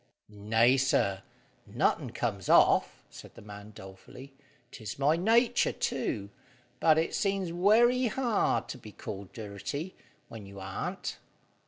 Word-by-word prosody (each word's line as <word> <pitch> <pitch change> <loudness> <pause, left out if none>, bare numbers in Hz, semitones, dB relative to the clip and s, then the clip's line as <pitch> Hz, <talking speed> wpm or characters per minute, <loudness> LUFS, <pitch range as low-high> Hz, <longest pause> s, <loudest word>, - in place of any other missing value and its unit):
"Nay, 110 +5 +3
sir; 100 -7 +1 0.5
nothin' - - 0
comes - - -3
off," - - +4
said - - -13
the - - -12
man 105 0 -11
dolefully. 95 +8 -12 0.4
"'Tis 110 -3 -7
my 145 +3 +3
natur 225 +7 +3
too, 100 0 -3 0.5
but 155 -1 +4
it 160 - 0
seems 195 -4 -1
werry 240 +7 +4
hard 240 -2 0
to 130 - -7
be 110 - -12
called 100 -3 -8
dirty, 115 - -6 0.3
when 110 -3 -10
you 100 0 -11
arn't." 95 0 -5
130 Hz, 130 wpm, -29 LUFS, -, 0.5 s, off